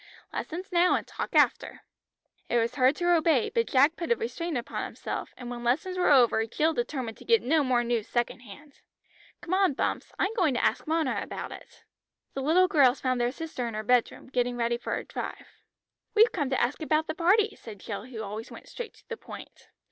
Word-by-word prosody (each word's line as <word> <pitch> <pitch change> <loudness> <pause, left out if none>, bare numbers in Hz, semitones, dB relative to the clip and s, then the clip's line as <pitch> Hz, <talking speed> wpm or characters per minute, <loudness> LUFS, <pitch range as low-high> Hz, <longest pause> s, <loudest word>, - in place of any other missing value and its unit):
Lessons 365 +4 -5
now, 355 0 +4
and - - -2
talk - - -6
after." - - +2 0.7
It 240 - +2
was 230 +1 +1
hard 260 +2 +3
to 350 +1 +1
obey, 315 -7 +2
but 465 -1 +1
Jack 285 +4 +4
put 345 +6 -4
a - - +5
restraint 345 - -3
upon 245 +4 -4
himself, - - -5
and 245 -1 -7
when 240 0 -6
lessons 300 +10 0
were 365 - +2
over 240 -5 +5
Jill 315 +8 +1
determined 240 -3 -3
to - - -13
get 460 -1 +3
no 305 +3 +3
more 250 -2 +2
news 235 -2 -1
second 240 +1 -1
hand. 280 +6 -14 0.6
"Come 345 - -4
on, 375 -6 +3
Bumps. - - -2
I'm 390 +3 0
going 350 - +1
to - - 0
ask - - +1
Mona 315 -3 0
about - - -6
it." - - -13 0.5
The 270 - -3
little 340 +7 +4
girls 280 -8 +4
found 255 -2 0
their 240 0 +1
sister 285 -4 -5
in 230 - -5
her 215 - -3
bedroom, 245 +2 +1
getting 245 -1 0
ready 235 0 0
for - - -3
a - - -4
drive. - - -6 0.7
"We've 445 +2 +6
come 290 -7 -1
to 265 - 0
ask 250 +7 0
about 310 0 +1
the 315 - -3
party," 400 +6 +3
said 215 -4 -11
Jill, 205 +1 -6
who 235 -4 -7
always 215 +3 -6
went - - -12
straight 480 -2 -8
to - - -23
the 465 - -5
point. - - -12
275 Hz, 215 wpm, -28 LUFS, 240-345 Hz, 0.7 s, We've